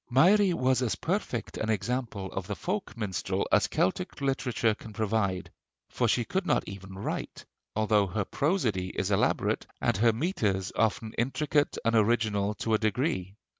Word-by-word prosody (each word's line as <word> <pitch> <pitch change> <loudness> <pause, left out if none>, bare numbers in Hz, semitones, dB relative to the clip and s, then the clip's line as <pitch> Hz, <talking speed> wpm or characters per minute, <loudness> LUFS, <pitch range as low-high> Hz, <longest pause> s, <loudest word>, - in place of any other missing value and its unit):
Mairi 185 +10 +5
was 130 -5 +2
as 120 -4 0
perfect - - -2
an 110 - -1
example 110 -2 -2
of 95 -1 -4
the 105 - -3
folk 185 - -3
minstrel 105 -5 -2
as - - +4
Celtic 180 - -1
literature 125 -5 +1
can 110 0 -11
provide; 100 -4 -1 0.4
for 120 - 0
she 120 +1 +2
could 190 - -1
not 160 -5 +1
even 95 -1 -8
write, 95 - -4 0.3
although 105 -2 +3
her 100 +2 -2
prosody 120 - 0
is - - 0
elaborate, - - +1
and - - +1
her 115 +3 +5
metres 110 - -1
often 110 0 0
intricate 145 +4 +1
and 115 - +3
original 105 -2 +2
to 115 - -1
a 110 - +4
degree. 110 - -1
110 Hz, 160 wpm, -29 LUFS, 100-130 Hz, 0.4 s, Mairi